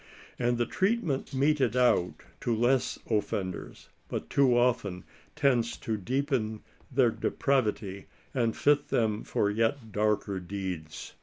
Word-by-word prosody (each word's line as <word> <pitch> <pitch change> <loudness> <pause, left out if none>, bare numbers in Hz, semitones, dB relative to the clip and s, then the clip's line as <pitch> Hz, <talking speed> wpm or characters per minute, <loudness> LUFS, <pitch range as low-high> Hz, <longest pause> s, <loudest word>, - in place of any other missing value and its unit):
And 120 -1 +1
the 120 - +1
treatment 185 - 0
meted 135 -2 +2
out 120 -8 +2 0.2
to 120 - 0
less 125 +3 +2
offenders, 100 -4 -3 0.2
but - - -5
too 130 -3 +4
often 115 -7 +1 0.3
tends 120 -4 +2
to 110 - -2
deepen 120 0 -1 0.3
their 125 -3 +4
depravity 110 -8 -1 0.3
and 120 -4 0
fit 145 0 +3
them 110 -2 0
for 105 - 0
yet 115 +2 0
darker 105 -2 0
deeds. 90 -4 -6
115 Hz, 125 wpm, -29 LUFS, 105-130 Hz, 0.3 s, too